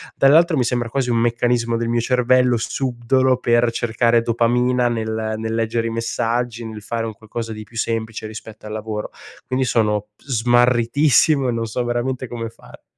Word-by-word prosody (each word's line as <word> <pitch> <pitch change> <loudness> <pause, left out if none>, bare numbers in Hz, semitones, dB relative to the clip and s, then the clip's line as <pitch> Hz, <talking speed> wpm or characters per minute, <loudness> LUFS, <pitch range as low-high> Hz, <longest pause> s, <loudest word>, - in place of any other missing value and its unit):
Dall'altro 160 +3 +5
mi 125 - +2
sembra 120 -1 -1
quasi 130 0 -1
un 115 - +2
meccanismo 120 0 +1
del 115 0 -2
mio 120 0 +1
cervello 125 0 +3
subdolo 130 +2 0
per 120 -1 +2
cercare 115 0 +1
dopamina 120 +1 +2
nel 110 -1 -2
nel 110 0 -3
leggere 115 0 -1
i - - -3
messaggi, 115 +1 -2
nel 110 -1 -7
fare 115 +1 -3
un 110 - -6
qualcosa 110 +2 -6
di 110 0 -8
più 115 +1 -13
semplice 110 -1 -2
rispetto 110 0 -10
al 105 - -6
lavoro. 110 -1 -4 0.4
Quindi 130 0 0
sono 105 -3 0
smarritissimo 125 +3 +3
e - - +1
non 115 -1 -2
so 120 +3 -2
veramente 120 +2 -2
come 115 -1 -5
fare. - - -17
120 Hz, 170 wpm, -20 LUFS, 115-125 Hz, 0.4 s, Dall'altro